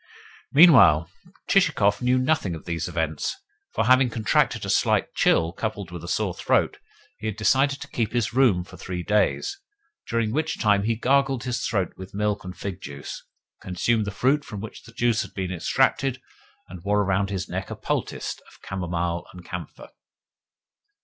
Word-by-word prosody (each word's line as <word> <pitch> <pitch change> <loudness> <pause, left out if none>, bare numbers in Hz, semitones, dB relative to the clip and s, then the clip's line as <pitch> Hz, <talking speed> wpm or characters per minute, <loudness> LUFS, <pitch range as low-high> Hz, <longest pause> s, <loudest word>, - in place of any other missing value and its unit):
Meanwhile 110 - +7 0.4
Chichikov 105 - +3
knew 125 +1 +3
nothing 130 - +1
of 80 - -11
these 85 0 -3
events; 80 -3 -2 0.4
for, 110 - 0
having 130 +1 +5
contracted 110 -3 +1
a - - -4
slight - - +2
chill, 85 +1 +2
coupled 100 -4 -4
with 85 -2 -7
a - - -7
sore 95 0 0
throat, - - +1 0.4
he 110 - -4
had 110 - -2
decided 135 +6 +2
to - - -7
keep 115 -3 -2
his 120 -1 -1
room 120 -9 +4
for - - -13
three 90 -1 -5
days; 105 - +1 0.5
during 115 -2 0
which 155 +5 -1
time 105 -2 +2
he 115 +1 +1
gargled 135 +1 +1
his 125 -1 -2
throat 95 -6 -1
with 95 +1 -10
milk 105 0 -1
and 90 0 -8
fig 95 -2 -5
juice, 70 0 -7 0.4
consumed 105 +5 0
the - - -3
fruit 135 +8 +1
from 105 - -7
which 110 +2 -8
the 115 - -13
juice 120 -2 +1
had - - -8
been 95 -2 -3
extracted, 130 +8 +1 0.5
and 90 -1 -10
wore 105 +1 +2
around 100 +1 0
his 95 -4 -3
neck - - -4
a - - -5
poultice - - -3
of - - -19
camomile 85 -2 -3
and 90 -1 -12
camphor. - - -8
105 Hz, 175 wpm, -24 LUFS, 90-125 Hz, 0.5 s, Meanwhile